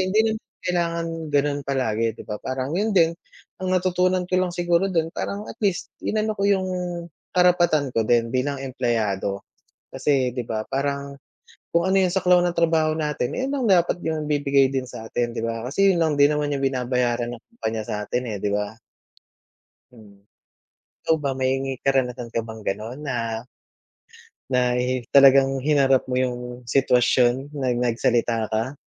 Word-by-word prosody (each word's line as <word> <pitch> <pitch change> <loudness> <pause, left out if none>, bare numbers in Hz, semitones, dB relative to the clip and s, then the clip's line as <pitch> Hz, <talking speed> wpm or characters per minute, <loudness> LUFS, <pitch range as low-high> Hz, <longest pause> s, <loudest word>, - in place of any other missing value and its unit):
hindi 215 +4 +2
naman 220 - -5 0.2
kailangan 170 -1 -1 0.3
gano'n 145 0 +2
palagi, 115 -5 0
’di - - -10
ba, 105 -1 -5
parang, 130 +2 -3
’yon 210 +1 0
din 165 -3 +5 0.5
ang 185 - -1
natutunan 185 0 +1
ko 180 - -2
lang 185 -1 0
siguro 175 +1 +2
do’n 165 -4 0
parang, 205 +4 -5
at - - -11
least, 200 -4 -1
inano 215 0 0
ko 200 - +1
’yong, 190 -2 +2 0.7
karapatan 175 -6 +3
ko 115 -1 +1
din 115 -1 +2
bilang 135 +2 -1
empleyado. 110 -7 -1 0.5
Kasi, 130 -4 +1
’di 125 - -2
ba, 110 -1 -3
parang 140 0 -2 0.6
kung 170 +2 +2
ano 190 0 +3
’yong 185 - +2
saklaw 180 -2 +4
ng 175 -1 -1
trabaho 160 -2 +2
natin, 150 -5 -1
eh, 260 - -1
’yon - - -3
lang 260 -4 -1
dapat 175 -1 +3
’yong 155 -1 -2
ibibigay 140 -2 +3
din 130 - 0
sa 110 - -8
atin, 120 +1 -1
’di - - -2
ba? 115 0 -3
Kasi 195 +6 +4
’yon 170 - 0
lang 160 -2 +2
din 145 +1 +5
naman 150 0 -1
’yong 140 -1 -2
binabayaran 125 -2 0
ng 115 - -13
kumpanya 110 - -3
sa’tin 105 +4 -3
eh, 105 -3 -4
’di 105 - 0
ba? 105 +1 -2 1.2
Hmm. 105 -4 -17 0.8
Ikaw 160 - +2
ba, 140 - +1
may 130 0 +1 0.3
karanasan 125 -3 0
ka - - 0
bang 110 0 -8
gano'n 110 +7 -4
na 130 -3 -2 1.3
na 125 -1 +2
hi 125 0 -1
talagang 135 -1 +6
hinarap 135 -2 +3
mo 125 - -1
'yong 125 -1 0 0.2
sitwasyon, 125 +2 +2
na 140 -3 -2
nagsalita 115 -1 +1
ka? 115 +6 -2
135 Hz, 170 wpm, -23 LUFS, 120-170 Hz, 1.3 s, talagang